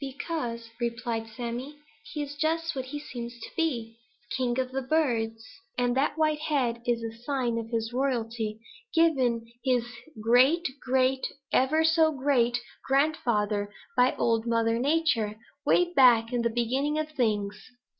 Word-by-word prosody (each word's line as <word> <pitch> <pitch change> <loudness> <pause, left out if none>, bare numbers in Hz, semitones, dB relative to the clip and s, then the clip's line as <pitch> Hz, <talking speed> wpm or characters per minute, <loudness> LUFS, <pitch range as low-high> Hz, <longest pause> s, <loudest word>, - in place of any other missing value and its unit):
"Because," 260 -5 -4
replied 235 -1 -2
Sammy, 240 +6 -5 0.3
"he 300 - -2
is 290 0 -7
just 325 +2 0
what 260 -1 -3
he 270 +3 -5
looks 240 -5 -7
to - - -8
be, 235 -9 -1 0.4
king 250 -2 0
of 255 0 -1
the 270 +1 -2
birds, 235 -6 0 0.3
and 245 0 +1
that 280 +3 +1
white 310 -1 +2
head 265 -7 0
is 235 -1 +1
the 225 0 -5
sign 245 -4 0
of 225 0 -6
his 230 0 -2
royalty 230 -4 -1 0.4
given 260 -9 +3 0.2
his 250 -3 +2 0.3
great 255 +10 +4 0.2
great 260 0 +2 0.3
ever 300 +5 +3
so 320 0 +4
great 260 -4 +2 0.3
grandfather 230 -8 +1 0.2
by 250 0 +4
Old 230 0 +1
Mother 230 0 +2
Nature, 270 -7 +1 0.3
way 355 0 +3
back 240 -5 +5
in 240 - +1
the 235 - +1
beginning 260 +6 0
of 310 0 -1
things." 210 -7 0
250 Hz, 145 wpm, -28 LUFS, 230-290 Hz, 0.4 s, back